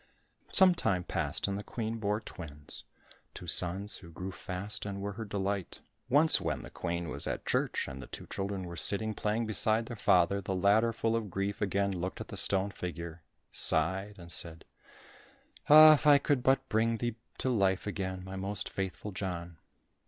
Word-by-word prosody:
Some 190 Hz, -1 st, +6 dB
time 100 Hz, -, -1 dB
passed -, -, -1 dB
and 100 Hz, 0 st, -3 dB
the -, -, -7 dB
Queen 115 Hz, 0 st, -4 dB
bore 105 Hz, 0 st, -1 dB
twins, 75 Hz, -8 st, -8 dB, 0.5 s
two -, -, -9 dB
sons 95 Hz, +4 st, +2 dB
who 85 Hz, -, -13 dB
grew 90 Hz, +4 st, -7 dB
fast 95 Hz, +3 st, -4 dB
and 100 Hz, -1 st, -5 dB
were 100 Hz, +1 st, -4 dB
her 110 Hz, +3 st, -7 dB
delight. 100 Hz, -2 st, -3 dB, 0.3 s
Once 150 Hz, +5 st, +6 dB
when -, -, -3 dB
the -, -, -11 dB
Queen 85 Hz, -1 st, -4 dB
was 70 Hz, -1 st, 0 dB
at -, -, -4 dB
church -, -, -1 dB
and 65 Hz, -1 st, -8 dB
the -, -, -10 dB
two -, -, -9 dB
children 100 Hz, -1 st, -4 dB
were 85 Hz, -1 st, -7 dB
sitting 105 Hz, +6 st, +2 dB
playing 105 Hz, +2 st, -1 dB
beside 110 Hz, +1 st, +2 dB
their 120 Hz, -, -7 dB
father, 100 Hz, -1 st, +2 dB
the 95 Hz, 0 st, -3 dB
latter 105 Hz, +5 st, +3 dB
full 115 Hz, 0 st, -1 dB
of 110 Hz, -3 st, -3 dB
grief 100 Hz, +2 st, -3 dB
again 100 Hz, 0 st, 0 dB
looked 90 Hz, 0 st, -4 dB
at -, -, -8 dB
the -, -, -7 dB
stone 100 Hz, +1 st, +4 dB
figure, 85 Hz, -2 st, -7 dB, 0.3 s
sighed 95 Hz, +2 st, +1 dB
and 85 Hz, -1 st, -11 dB
said, 85 Hz, -2 st, -3 dB, 1.0 s
"Ah, 155 Hz, +1 st, +10 dB
if 150 Hz, -, 0 dB
I 145 Hz, -1 st, +8 dB
could 140 Hz, -1 st, 0 dB
but 135 Hz, +2 st, +2 dB
bring 115 Hz, +1 st, +1 dB
thee 120 Hz, -1 st, -3 dB, 0.2 s
to 130 Hz, -, -1 dB
life 95 Hz, -5 st, +1 dB
again, 95 Hz, -2 st, -4 dB
my 95 Hz, +1 st, -8 dB
most 100 Hz, +1 st, -4 dB
faithful 95 Hz, +2 st, -5 dB
John." 90 Hz, -3 st, -5 dB
100 Hz, 185 wpm, -30 LUFS, 90-110 Hz, 1.0 s, Ah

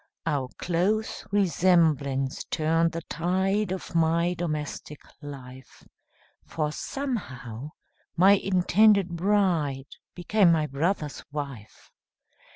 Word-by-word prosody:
Our 145 Hz, -5 st, -1 dB
close 190 Hz, +6 st, -1 dB
resemblance 160 Hz, -8 st, +2 dB
turned 165 Hz, +1 st, +1 dB
the 165 Hz, 0 st, -5 dB
tide 190 Hz, +5 st, 0 dB
Of 190 Hz, -1 st, -5 dB
my 165 Hz, +1 st, +2 dB
domestic 150 Hz, -3 st, -5 dB, 0.2 s
life, 130 Hz, -3 st, -11 dB, 0.6 s
For 150 Hz, -2 st, -3 dB
somehow, 140 Hz, -, -5 dB, 0.5 s
my 190 Hz, +3 st, +6 dB
intended 195 Hz, +1 st, +4 dB
bride 170 Hz, -7 st, 0 dB, 0.2 s
Became 180 Hz, +1 st, +3 dB
my 160 Hz, -2 st, +2 dB
brother's 150 Hz, +2 st, -2 dB
wife. 140 Hz, -8 st, -8 dB
165 Hz, 90 wpm, -26 LUFS, 145-190 Hz, 0.6 s, my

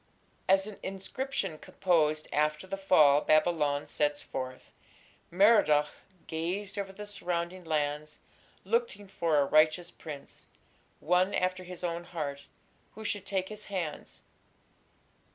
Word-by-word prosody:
As 190 Hz, 0 st, +5 dB
an 215 Hz, -1 st, -9 dB
inscription 195 Hz, -, -4 dB
composed 155 Hz, -4 st, +1 dB
after 150 Hz, +3 st, +1 dB
the 190 Hz, -, -4 dB
fall 155 Hz, -7 st, +5 dB
of -, -, -10 dB
Babylon 155 Hz, -2 st, +3 dB
sets 145 Hz, -1 st, 0 dB
forth; 130 Hz, -1 st, -6 dB, 0.6 s
Merodach 175 Hz, -6 st, +5 dB, 0.4 s
"gazed 190 Hz, +5 st, -3 dB
over 195 Hz, -1 st, -4 dB
the 210 Hz, +2 st, -8 dB
surrounding 180 Hz, -3 st, -3 dB
lands... 150 Hz, -1 st, -2 dB, 0.5 s
looking 465 Hz, -, -1 dB
for 165 Hz, -5 st, 0 dB
a 140 Hz, -, +4 dB
righteous 155 Hz, +4 st, +3 dB
prince, 145 Hz, -3 st, -10 dB, 0.5 s
one 180 Hz, +4 st, +2 dB
after 185 Hz, 0 st, 0 dB
his 180 Hz, 0 st, -9 dB
own 170 Hz, 0 st, -2 dB
heart, 145 Hz, -5 st, -5 dB, 0.5 s
who 220 Hz, -, -8 dB
should 205 Hz, -2 st, -3 dB
take 190 Hz, -1 st, -1 dB
his 210 Hz, 0 st, -9 dB
hands.... 175 Hz, -7 st, -5 dB
175 Hz, 125 wpm, -30 LUFS, 150-195 Hz, 0.6 s, As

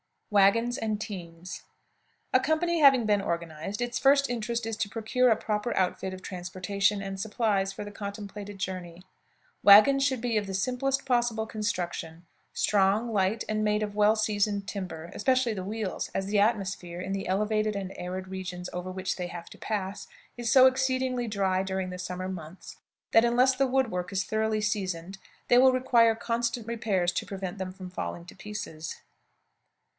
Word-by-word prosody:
WAGONS 230 Hz, +5 st, +4 dB
AND 215 Hz, -3 st, -1 dB
TEAMS. 180 Hz, -4 st, -7 dB, 0.7 s
A 255 Hz, -, +6 dB
company 315 Hz, +5 st, +1 dB
having 270 Hz, -5 st, +6 dB
been 205 Hz, -1 st, +2 dB
organized, 170 Hz, +3 st, -4 dB
its 240 Hz, 0 st, -1 dB
first 280 Hz, 0 st, +4 dB
interest 235 Hz, -1 st, -2 dB
is 225 Hz, -1 st, -3 dB
to 220 Hz, -3 st, -1 dB
procure 235 Hz, +3 st, +1 dB
a 225 Hz, -, +5 dB
proper 210 Hz, +2 st, -2 dB
outfit 190 Hz, 0 st, 0 dB
of 185 Hz, -, -9 dB
transportation 195 Hz, +2 st, -1 dB
and 195 Hz, 0 st, -5 dB
supplies 205 Hz, -2 st, 0 dB
for 205 Hz, -, -6 dB
the 205 Hz, -, -8 dB
contemplated 205 Hz, 0 st, -7 dB
journey. 180 Hz, -2 st, -5 dB, 0.6 s
Wagons 215 Hz, +7 st, +8 dB
should 260 Hz, -4 st, +1 dB
be 235 Hz, -2 st, 0 dB
of 205 Hz, -1 st, -1 dB
the 195 Hz, -, -5 dB
simplest 255 Hz, +7 st, 0 dB
possible 240 Hz, -3 st, +1 dB
construction 180 Hz, -6 st, -4 dB, 0.3 s
strong, 205 Hz, +3 st, +2 dB
light, 200 Hz, +2 st, +1 dB
and 215 Hz, 0 st, 0 dB
made 210 Hz, 0 st, +1 dB
of 205 Hz, -1 st, -4 dB
well 210 Hz, +1 st, +4 dB
seasoned 205 Hz, -2 st, 0 dB
timber, 180 Hz, -5 st, -6 dB
especially 255 Hz, -3 st, +2 dB
the 190 Hz, -3 st, -5 dB
wheels, 210 Hz, -2 st, -3 dB
as 195 Hz, 0 st, -1 dB
the 205 Hz, 0 st, +2 dB
atmosphere, 195 Hz, -5 st, 0 dB
in 185 Hz, +1 st, -4 dB
the 195 Hz, 0 st, -3 dB
elevated 215 Hz, +2 st, 0 dB
and 195 Hz, -1 st, -4 dB
arid 185 Hz, +1 st, -5 dB
region 185 Hz, -1 st, -5 dB
over 180 Hz, +1 st, -4 dB
which 185 Hz, 0 st, -3 dB
they 180 Hz, -1 st, -3 dB
have 170 Hz, -1 st, -8 dB
to -, -, -12 dB
pass, 200 Hz, -, -4 dB, 0.3 s
is 240 Hz, -1 st, -3 dB
so 260 Hz, -1 st, +8 dB
exceedingly 260 Hz, -1 st, +1 dB
dry 195 Hz, -3 st, +1 dB
during 190 Hz, -1 st, -2 dB
the 180 Hz, -, -7 dB
summer 180 Hz, +1 st, -4 dB
months 175 Hz, -1 st, -9 dB, 0.3 s
that, 225 Hz, +1 st, +6 dB
unless 250 Hz, +2 st, +4 dB
the 270 Hz, +1 st, +2 dB
wood 260 Hz, -2 st, +1 dB
work 180 Hz, +1 st, -3 dB
is 195 Hz, 0 st, 0 dB
thoroughly 220 Hz, 0 st, 0 dB
seasoned, 195 Hz, -3 st, -2 dB, 0.3 s
they 245 Hz, -, +7 dB
will 260 Hz, 0 st, +6 dB
require 235 Hz, -3 st, +4 dB
constant 235 Hz, 0 st, -2 dB
repairs 215 Hz, -6 st, 0 dB
to 175 Hz, -, -3 dB
prevent 195 Hz, 0 st, -5 dB
them 185 Hz, -1 st, -3 dB
from 185 Hz, -1 st, -9 dB
falling 175 Hz, -1 st, -5 dB
to -, -, -12 dB
pieces. 185 Hz, -7 st, -6 dB
205 Hz, 175 wpm, -28 LUFS, 185-230 Hz, 0.7 s, Wagons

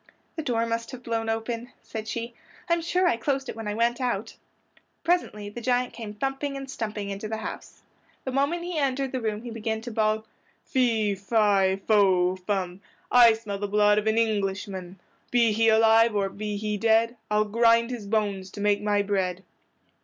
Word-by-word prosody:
"The 320 Hz, -, -3 dB
door 235 Hz, -6 st, 0 dB
must 230 Hz, 0 st, -3 dB
have 250 Hz, -1 st, -8 dB
blown 225 Hz, -1 st, -2 dB
open," 230 Hz, +2 st, -3 dB
said 220 Hz, -1 st, -6 dB
she. 235 Hz, +1 st, -4 dB, 0.3 s
"I'm 340 Hz, -1 st, +2 dB
sure 360 Hz, +2 st, +1 dB
I 235 Hz, -, +2 dB
closed 270 Hz, +2 st, -1 dB
it -, -, -5 dB
when 225 Hz, -1 st, -6 dB
I 205 Hz, -, -2 dB
went 235 Hz, +3 st, +1 dB
out." 240 Hz, -4 st, -2 dB, 0.7 s
Presently 335 Hz, -12 st, 0 dB
the 210 Hz, +4 st, -7 dB
giant 250 Hz, +1 st, 0 dB
came 215 Hz, -3 st, -7 dB
thumping 270 Hz, +3 st, -2 dB
and 270 Hz, 0 st, -7 dB
stumping 210 Hz, -5 st, -4 dB
into 200 Hz, +2 st, -5 dB
the 220 Hz, +1 st, -3 dB
house. 220 Hz, -, -8 dB, 0.4 s
The 260 Hz, -, -3 dB
moment 285 Hz, +6 st, 0 dB
he 350 Hz, -2 st, -3 dB
entered 270 Hz, -1 st, 0 dB
the 260 Hz, -, -3 dB
room 215 Hz, 0 st, -2 dB
he 240 Hz, -, -6 dB
began 220 Hz, -1 st, -3 dB
to 240 Hz, +1 st, -7 dB
bawl— 215 Hz, 0 st, 0 dB, 0.4 s
"Fee, 225 Hz, -5 st, +1 dB
fi, 200 Hz, -1 st, +2 dB
fo, 185 Hz, -4 st, +4 dB
fum! 185 Hz, -1 st, -3 dB, 0.3 s
I 240 Hz, -2 st, +8 dB
smell 215 Hz, -3 st, -5 dB
the 205 Hz, -, -2 dB
blood 210 Hz, +1 st, +4 dB
of 215 Hz, -, -4 dB
an 220 Hz, +1 st, +2 dB
Englishman; 195 Hz, -4 st, -1 dB, 0.3 s
Be 235 Hz, -2 st, +3 dB
he 225 Hz, +1 st, +3 dB
alive 225 Hz, 0 st, +5 dB
or 200 Hz, -1 st, +1 dB
be 210 Hz, +1 st, -4 dB
he 210 Hz, 0 st, -2 dB
dead, 225 Hz, +2 st, +3 dB
I'll 210 Hz, 0 st, +2 dB
grind 230 Hz, +2 st, +3 dB
his 230 Hz, -5 st, -6 dB
bones 200 Hz, -3 st, -1 dB
to 205 Hz, -, -8 dB
make 205 Hz, 0 st, +2 dB
my 205 Hz, -1 st, +1 dB
bread." 190 Hz, -2 st, -1 dB
220 Hz, 190 wpm, -26 LUFS, 205-240 Hz, 0.7 s, I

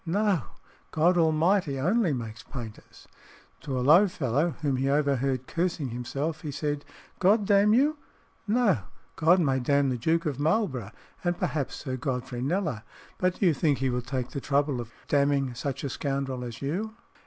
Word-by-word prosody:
No; 195 Hz, 0 st, +1 dB, 0.5 s
God 170 Hz, +3 st, +3 dB
Almighty 160 Hz, -2 st, +2 dB
only 185 Hz, -, +2 dB
makes 115 Hz, -4 st, -5 dB
painters." 115 Hz, -5 st, -10 dB, 0.5 s
To 135 Hz, -1 st, -4 dB
a 125 Hz, -, -1 dB
low 170 Hz, +8 st, +7 dB
fellow 150 Hz, -1 st, 0 dB
whom 140 Hz, -3 st, +1 dB
he 135 Hz, +1 st, 0 dB
overheard 140 Hz, -3 st, +1 dB
cursing 170 Hz, -5 st, -1 dB
himself 135 Hz, +7 st, -3 dB
he 150 Hz, -, -5 dB
said, 145 Hz, 0 st, -2 dB, 0.4 s
"God 205 Hz, +3 st, +4 dB
damn 200 Hz, +1 st, +4 dB
you? 290 Hz, +4 st, +2 dB, 0.5 s
No, 215 Hz, -, +3 dB, 0.4 s
God 165 Hz, +3 st, +4 dB
may 135 Hz, -6 st, +2 dB
damn 140 Hz, +2 st, +2 dB
the 125 Hz, -, -1 dB
Duke 165 Hz, +7 st, +1 dB
of 145 Hz, -3 st, -2 dB
Marlborough, 150 Hz, -, 0 dB, 0.3 s
and 175 Hz, -1 st, 0 dB
perhaps 140 Hz, -1 st, -2 dB
Sir 130 Hz, -2 st, -4 dB
Godfrey 125 Hz, -1 st, -3 dB
Kneller; 150 Hz, -, -1 dB, 0.4 s
but 185 Hz, 0 st, +1 dB
do -, -, +2 dB
you 170 Hz, -, +5 dB
think 145 Hz, 0 st, +1 dB
he 135 Hz, -1 st, 0 dB
will 125 Hz, 0 st, -1 dB
take 125 Hz, 0 st, -3 dB
the 140 Hz, -, -5 dB
trouble 140 Hz, -2 st, +1 dB
of 115 Hz, -1 st, -10 dB, 0.2 s
damning 140 Hz, -2 st, +2 dB
such 135 Hz, +2 st, -4 dB
a 140 Hz, -, -2 dB
scoundrel 135 Hz, -2 st, -2 dB
as 120 Hz, +1 st, -7 dB
you?" 205 Hz, +10 st, -3 dB
145 Hz, 170 wpm, -27 LUFS, 130-175 Hz, 0.5 s, low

